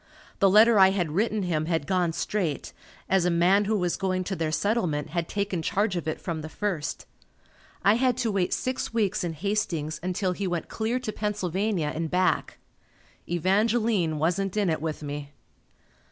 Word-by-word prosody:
The 195 - +5
letter 215 +2 +6
I 190 0 +8
had 180 -5 -1
written 210 +4 0
him 160 -3 -1
had 165 -4 0
gone 180 -2 +1
straight, 175 -2 -2 0.3
as 190 -2 +3
a 180 - +2
man 180 +4 +3
who 215 +1 +1
was 180 -3 0
going 185 -1 -1
to 190 +1 -3
their 160 -3 -1
settlement 165 -6 0
had 170 0 -2
taken 200 -4 -2
charge 195 +4 0
of 170 -2 -3
it 155 - -2
from 165 -3 -4
the 155 - -7
first. 185 -5 -3 0.8
I 200 - +6
had 255 -1 +2
to 235 -3 0
wait 190 -3 0
six 255 0 -2
weeks 210 -3 0
in 170 -2 -2
Hastings 165 -4 -2
until 185 +1 -1
he 190 +2 -3
went 175 -2 -3
clear 225 +3 -1
to 250 -4 -4
Pennsylvania 200 -5 -1
and 160 0 -3
back. 185 +2 +1 0.7
Evangeline 195 -1 +1
wasn't 180 +6 0
in 200 -5 +2
it 160 - -2
with 155 -1 -4
me. 145 0 -6
185 Hz, 180 wpm, -26 LUFS, 165-210 Hz, 0.8 s, I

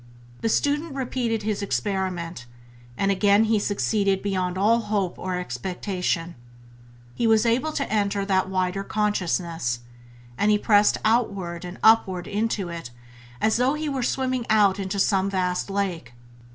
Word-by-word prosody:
The 225 - -1
student 290 +5 0
repeated 240 -4 -2
his 210 -1 -2
experiment, 175 -2 -2 0.5
and 200 0 +1
again 200 +2 +4
he 220 -1 +2
succeeded 200 - 0
beyond 185 -2 -1
all 220 +4 +3
hope 205 -5 -2
or 185 -1 -3
expectation. 180 - -3 0.8
He 230 - 0
was 220 0 +4
able 255 +7 +1
to 280 - -1
enter 200 -2 0
that 190 -1 +1
wider 185 +1 -1
Consciousness, 170 - -1 0.6
and 210 - +3
he 210 - +5
pressed 205 0 +4
onward 200 -7 0
and 180 +1 -7
upward 190 -5 +4
into 205 -2 -1
it 165 -6 -6 0.5
as 220 +6 +2
though 255 +4 +2
he 305 0 -3
were 270 -2 -2
swimming 255 -1 -1
out 205 -3 +4
into 195 0 -3
some 195 0 +2
vast 180 -1 -1
lake. 185 -11 -3
200 Hz, 145 wpm, -24 LUFS, 180-220 Hz, 0.8 s, he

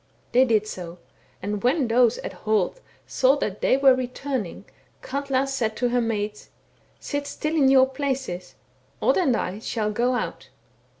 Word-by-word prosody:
* - - -37
They 255 +2 +5
did 220 -4 +2
so; 180 -4 -7 0.5
and 205 +1 -2
when 260 +2 +2
those 240 0 +3
at - - -6
Holt 215 - 0 0.3
saw 265 +1 +3
that 210 -8 -3
they 260 - +3
were 270 -1 +6
returning, 255 -4 -4 0.4
Katla 275 -1 -1
said 245 -5 -2
to 245 0 +1
her 245 0 +1
maids, 210 -2 -3 0.3
* - - -36
Sit 285 -1 -4
still 305 +2 -3
in 275 -4 +4
your 265 -1 +6
places, 265 -9 -4 0.4
Odd - - +2
and 275 -11 +2
I 195 +3 -3
shall 215 -1 -2
go 240 +4 +1
out.' - - -4
250 Hz, 170 wpm, -24 LUFS, 215-270 Hz, 0.5 s, were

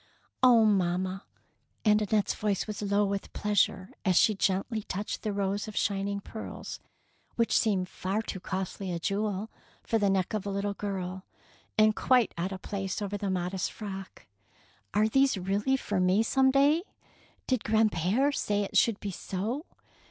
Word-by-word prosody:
'' - - -39
Oh, 240 -3 +7
mamma! 185 -1 +1 0.3
" - - -44
and 210 0 +5
Annette's 210 0 +1
voice 205 -3 -1
was 215 -1 -5
low 205 0 +2
with 200 0 -3
pleasure 200 -2 +1
as 185 -3 +2
she 215 - +5
gently 195 +3 0
touched 205 0 -4
the 215 - -2
rows 200 +1 -1
of 215 - -7
shining 200 0 0
pearls 220 +2 -7 0.6
which 230 -1 +1
seemed 195 -5 +2
far 195 +4 -2
too 195 - -5
costly 190 0 -4
a 170 - -1
jewel 205 +3 -2 0.3
for 225 - +1
the 200 -1 +2
neck 190 0 0
of 215 -3 -1
a - - -1
little 200 +1 -1
girl, 190 -2 -4 0.5
and 215 0 +5
quite 250 -3 +3
out 175 +3 -2
of 190 -1 -7
place 195 -1 -3
over 205 -1 -3
the 200 -1 -2
modest 180 0 -1
frock. 195 -3 -8 0.7
Are 215 +1 +4
these 270 0 +3
really 200 +8 +1
for 205 -6 -2
me 185 +4 +3
some 265 +3 +3
day 280 +3 +4
I - - -9 0.6
Did 255 -4 0
grandpere 215 - +2
say 205 -5 0
it 200 - -6
should 225 -3 +4
be 200 - -4
so?" 220 - -4
205 Hz, 175 wpm, -29 LUFS, 190-215 Hz, 0.7 s, Oh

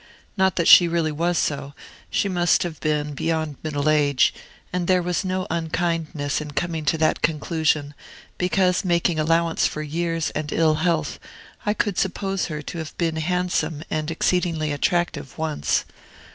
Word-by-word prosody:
Not 190 -2 +2
that 170 - +1
she 175 - +9
really 165 -2 0
was 170 +3 0
so; 140 -1 -2 0.3
she - - +1
must 175 -2 +2
have 170 -3 -5
been 150 -1 -1
beyond 155 -1 -2
middle 145 -2 -2
age: 145 -3 +3 0.4
and 180 -1 -1
there 185 -1 +4
was 180 +2 -1
no 185 0 -2
unkindness 165 -3 -1
in 150 -1 -7
coming 160 +2 -2
to 160 - +2
that 155 0 +1
conclusion, 155 -2 0 0.5
because, 180 +1 +2
making 170 -2 +1
allowance 165 +1 +2
for 155 - -5
years 165 +2 -2
and 150 -1 -4
ill 160 -1 +3
health, 165 -3 0 0.5
I 210 - +2
could 205 -4 0
suppose 195 0 -1
her 150 -3 -5
to 170 - -6
have 160 0 -7
been 165 -2 0
handsome 175 -2 -1
and 155 0 -1
exceedingly 165 -2 0
attractive 175 -1 -1
once. 155 -2 0
165 Hz, 160 wpm, -23 LUFS, 155-175 Hz, 0.5 s, she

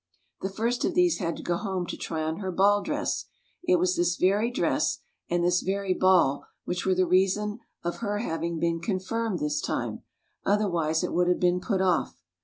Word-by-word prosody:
The 190 - -2
first 230 +5 -1
of - - 0
these 355 -2 +3
had 170 -4 -2
to - - -8
go 175 -1 0
home 190 -4 -2
to - - -5
try 160 -1 -3
on 160 +1 -2
her 190 -2 -3
ball 200 +3 +4
dress; - - -2 0.4
it 360 +1 +4
was 360 +1 +2
this 350 0 +1
very 205 +5 +2
dress 245 - 0 0.3
and 175 0 +1
this 175 +1 +3
very 195 0 0
ball 180 -8 +3 0.2
which 180 +1 -2
were 190 - +3
the 185 0 +3
reason 195 +4 +1 0.2
of 170 0 -2
her 205 -2 -2
having 170 -5 -2
been 170 0 0
confirmed 200 +3 -2
this 150 -1 -1
time; - - -3 0.4
otherwise 175 -6 +1
it - - -2
would 175 0 +2
have 180 - +2
been 180 0 +2
put 190 -1 0
off. 180 -3 0
185 Hz, 200 wpm, -27 LUFS, 175-210 Hz, 0.4 s, ball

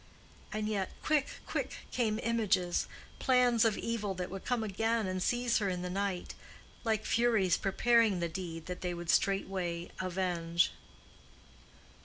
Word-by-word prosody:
And 215 -1 -2
yet 200 -3 -1
quick, 300 -3 +2 0.2
quick, - - -3
came 220 -3 0
images, 205 -6 +1 0.3
plans 250 -3 +4
of 225 -3 +3
evil 210 -4 -2
that 180 0 -4
would 195 0 -6
come 245 -3 0
again 225 +2 0
and 185 0 -2
seize 240 +3 +2
her 200 -2 0
in 180 -1 -2
the 180 - -3
night, 195 -1 -2 0.5
like 220 -2 0
furies 225 -7 +3
preparing 225 0 +3
the 170 - 0
deed 165 -1 -6
that 180 0 -6
they 180 -1 -2
would 170 -1 -1
straightway 185 -3 0
avenge. 175 -2 +1
195 Hz, 145 wpm, -32 LUFS, 180-230 Hz, 0.5 s, plans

